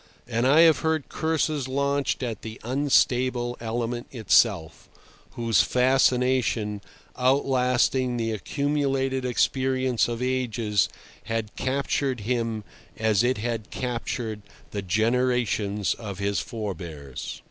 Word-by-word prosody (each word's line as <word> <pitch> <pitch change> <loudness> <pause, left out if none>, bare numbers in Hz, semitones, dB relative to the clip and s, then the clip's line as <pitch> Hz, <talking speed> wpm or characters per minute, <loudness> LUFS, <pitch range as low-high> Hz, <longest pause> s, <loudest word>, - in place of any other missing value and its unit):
And 120 +1 +1
I 150 +4 +6
have 165 -2 +6
heard 160 -2 -1
curses 155 -3 -1
launched 140 0 0
at 115 -4 -4
the 110 0 -8
unstable 125 -1 +1
element 120 +1 -3
itself, 105 - +2 0.4
whose 115 -5 +3
fascination, 125 -4 +2 0.3
outlasting 125 -1 +2
the 115 -1 -1
accumulated 135 +2 -1
experience 130 0 +1
of 120 -1 -3
ages, 115 -5 0 0.4
had 115 -1 -3
captured 135 -1 -1
him 115 -1 -1 0.3
as 110 -2 +2
it 125 +1 +2
had 115 0 -3
captured 115 -3 -3 0.3
the 100 - -3
generations 110 0 +1
of 100 -4 -7
his 100 +1 0
forebears. 85 - -6
120 Hz, 105 wpm, -25 LUFS, 110-130 Hz, 0.4 s, I